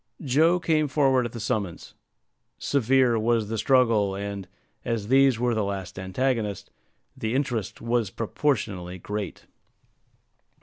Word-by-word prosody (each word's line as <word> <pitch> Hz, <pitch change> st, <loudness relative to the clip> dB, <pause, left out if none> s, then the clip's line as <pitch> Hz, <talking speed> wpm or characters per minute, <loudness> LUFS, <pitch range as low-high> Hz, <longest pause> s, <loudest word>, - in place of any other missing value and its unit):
Joe 160 Hz, +6 st, +3 dB
came 155 Hz, -3 st, +1 dB
forward 130 Hz, -3 st, +2 dB
at -, -, -12 dB
the 115 Hz, -, -7 dB
summons. 105 Hz, -5 st, -3 dB, 0.6 s
Severe 130 Hz, -3 st, +2 dB
was 115 Hz, -1 st, +1 dB
the 115 Hz, -, -2 dB
struggle; 115 Hz, -5 st, +3 dB
and, 100 Hz, -1 st, -5 dB, 0.4 s
as 115 Hz, -3 st, -2 dB
these 135 Hz, -2 st, +5 dB
were 120 Hz, 0 st, +1 dB
the 110 Hz, -2 st, 0 dB
last 95 Hz, -2 st, -4 dB
antagonists, 105 Hz, +2 st, -2 dB, 0.4 s
the 110 Hz, +2 st, -2 dB
interest 125 Hz, -7 st, -2 dB
was 115 Hz, -3 st, 0 dB
proportionally 105 Hz, -, -2 dB
great. 105 Hz, +1 st, -5 dB
115 Hz, 125 wpm, -26 LUFS, 100-130 Hz, 0.6 s, these